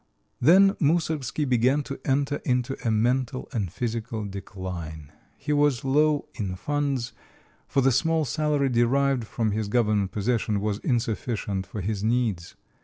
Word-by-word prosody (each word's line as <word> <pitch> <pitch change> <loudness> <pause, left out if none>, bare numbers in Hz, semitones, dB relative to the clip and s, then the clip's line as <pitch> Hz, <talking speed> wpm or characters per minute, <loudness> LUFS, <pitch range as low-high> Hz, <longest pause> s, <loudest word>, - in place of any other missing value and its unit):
Then 190 +9 +7
Moussorgsky 150 -3 0
began 130 +4 +2
to 135 -1 -7
enter 140 +1 +1
into 125 +1 -1
a 115 - +1
mental 125 +4 0
and 105 - -2
physical 115 -2 -3
decline. 90 -6 -7 0.3
He 150 +1 -2
was 145 -2 +2
low 150 +2 +2
in 95 -5 -4
funds, 140 +1 -2 0.5
for 135 - +1
the 135 +1 +4
small 160 +5 +2
salary 150 0 +1
derived 125 +1 +2
from 110 0 -1
his 105 0 -1
government 105 -3 +1
position 110 0 0
was 105 0 -2
insufficient 110 -5 -2
for 105 - -5
his 100 +1 -2
needs. 110 -7 0
120 Hz, 140 wpm, -26 LUFS, 105-140 Hz, 0.5 s, Then